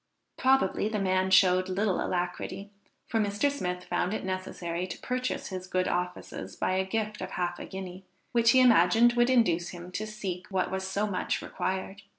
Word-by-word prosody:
Probably 260 Hz, -6 st, +2 dB
the 215 Hz, -, -2 dB
man 190 Hz, -1 st, +1 dB
showed 185 Hz, -1 st, +5 dB
little 195 Hz, +1 st, 0 dB
alacrity, 185 Hz, +2 st, -3 dB, 0.3 s
for 225 Hz, -, -1 dB
Mr. 205 Hz, +7 st, +1 dB
Smith 180 Hz, -9 st, -3 dB
found 180 Hz, +3 st, -1 dB
it -, -, -4 dB
necessary 185 Hz, -2 st, -3 dB
to 180 Hz, -, -6 dB
purchase 255 Hz, 0 st, -3 dB
his 185 Hz, -1 st, -6 dB
good 185 Hz, 0 st, 0 dB
offices 175 Hz, -, -4 dB
by -, -, -1 dB
a 190 Hz, 0 st, +2 dB
gift 215 Hz, +2 st, -3 dB
of -, -, -4 dB
half 175 Hz, 0 st, -2 dB
a -, -, -6 dB
guinea, 190 Hz, -1 st, -7 dB, 0.3 s
which 230 Hz, -1 st, +4 dB
he 255 Hz, +2 st, +6 dB
imagined 230 Hz, 0 st, +6 dB
would 240 Hz, +1 st, +3 dB
induce 175 Hz, -9 st, +3 dB
him 175 Hz, 0 st, -9 dB
to 215 Hz, +3 st, -3 dB
seek 195 Hz, -4 st, -5 dB
what 190 Hz, -2 st, -1 dB
was 190 Hz, 0 st, -2 dB
so 200 Hz, +2 st, 0 dB
much 200 Hz, -3 st, -1 dB
required. 190 Hz, +1 st, -3 dB
190 Hz, 180 wpm, -29 LUFS, 180-215 Hz, 0.3 s, he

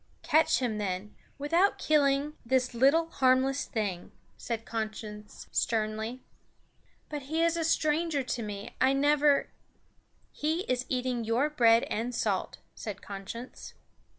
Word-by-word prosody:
"Catch 320 Hz, -1 st, +4 dB
him 230 Hz, -5 st, -1 dB
then, 195 Hz, 0 st, -3 dB, 0.2 s
without 335 Hz, +7 st, +2 dB
killing 290 Hz, -1 st, +2 dB
this 255 Hz, +1 st, +1 dB
little 280 Hz, +7 st, +4 dB
harmless 265 Hz, -1 st, +2 dB
thing," 200 Hz, -7 st, -3 dB, 0.2 s
said 230 Hz, -1 st, -4 dB
Conscience 215 Hz, -2 st, -6 dB
sternly. 220 Hz, +2 st, -1 dB, 0.8 s
"But 295 Hz, -1 st, -5 dB
he 325 Hz, +1 st, +1 dB
is 335 Hz, 0 st, +2 dB
a 335 Hz, -, -1 dB
stranger 310 Hz, -2 st, +1 dB
to 245 Hz, -1 st, -3 dB
me; 205 Hz, -1 st, -6 dB
I 265 Hz, +1 st, +5 dB
never 290 Hz, +1 st, +3 dB, 0.4 s
" -, -, -39 dB
"He 320 Hz, +3 st, +1 dB
is 255 Hz, -7 st, -2 dB
eating 250 Hz, -2 st, -1 dB
your 240 Hz, +7 st, +1 dB
bread 230 Hz, -5 st, +5 dB
and 235 Hz, +3 st, -3 dB
salt," 200 Hz, -5 st, -1 dB, 0.2 s
said 210 Hz, -3 st, -7 dB
Conscience. 205 Hz, +5 st, -8 dB
255 Hz, 130 wpm, -29 LUFS, 220-295 Hz, 0.8 s, I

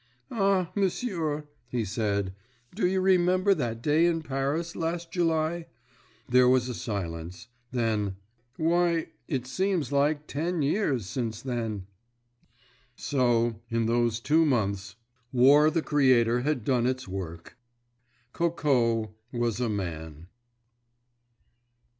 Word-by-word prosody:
"Ah, 195 Hz, -5 st, +1 dB
m'sieur," 175 Hz, -7 st, -1 dB, 0.2 s
he 120 Hz, -3 st, -1 dB
said, 100 Hz, -2 st, -1 dB, 0.4 s
"do 185 Hz, -1 st, +1 dB
you 190 Hz, +1 st, +1 dB
remember 185 Hz, +1 st, +4 dB
that 120 Hz, -8 st, -3 dB
day 155 Hz, +3 st, +4 dB
in 165 Hz, -2 st, 0 dB
Paris, 145 Hz, +4 st, -2 dB
last 165 Hz, 0 st, -3 dB
July?" 165 Hz, -1 st, 0 dB, 0.6 s
There 125 Hz, 0 st, +5 dB
was 130 Hz, -1 st, +3 dB
a 125 Hz, -, -3 dB
silence. 90 Hz, -2 st, -5 dB, 0.2 s
Then—"Why, 120 Hz, -, -1 dB, 0.2 s
it 130 Hz, -5 st, -2 dB
seems 180 Hz, +3 st, -1 dB
like 145 Hz, +1 st, +1 dB
ten 165 Hz, +2 st, -2 dB
years 140 Hz, -, 0 dB
since 110 Hz, +1 st, -4 dB
then!" 115 Hz, -6 st, -3 dB, 1.1 s
So, 120 Hz, -5 st, +1 dB
in 115 Hz, 0 st, 0 dB
those 115 Hz, -1 st, +1 dB
two 155 Hz, +7 st, +3 dB
months, 100 Hz, -8 st, 0 dB, 0.4 s
War 140 Hz, +4 st, +6 dB
the 165 Hz, 0 st, -1 dB
Creator 125 Hz, -5 st, +3 dB
had 140 Hz, -4 st, -1 dB
done 125 Hz, -3 st, +2 dB
its 130 Hz, -2 st, -2 dB
work. 85 Hz, -3 st, -7 dB, 0.8 s
Coco 125 Hz, -10 st, +1 dB, 0.2 s
was 120 Hz, -2 st, -1 dB
a 125 Hz, -2 st, 0 dB
man. 80 Hz, -6 st, -5 dB
130 Hz, 110 wpm, -27 LUFS, 115-165 Hz, 1.1 s, War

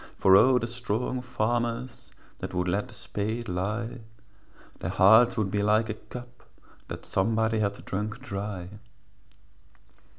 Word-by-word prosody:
For 95 Hz, 0 st, +6 dB
O 125 Hz, +6 st, +6 dB
the 120 Hz, -, -1 dB
strong 120 Hz, +1 st, -2 dB
farmers 120 Hz, 0 st, -2 dB, 0.3 s
That -, -, -5 dB
would 90 Hz, 0 st, 0 dB
let 100 Hz, +4 st, 0 dB
the -, -, -13 dB
spade 110 Hz, +3 st, -3 dB
lie, 105 Hz, +7 st, -3 dB, 0.7 s
For -, -, -26 dB
their -, -, -3 dB
hearts 110 Hz, +5 st, +6 dB
would 105 Hz, -3 st, 0 dB
be 105 Hz, -, +1 dB
like 110 Hz, +2 st, +2 dB
a -, -, 0 dB
cup 120 Hz, +3 st, -11 dB, 0.5 s
That -, -, -7 dB
somebody 110 Hz, +2 st, +1 dB
had 100 Hz, -1 st, -2 dB
drunk 105 Hz, +4 st, -3 dB
dry. 100 Hz, -6 st, -5 dB
110 Hz, 140 wpm, -27 LUFS, 100-120 Hz, 0.7 s, For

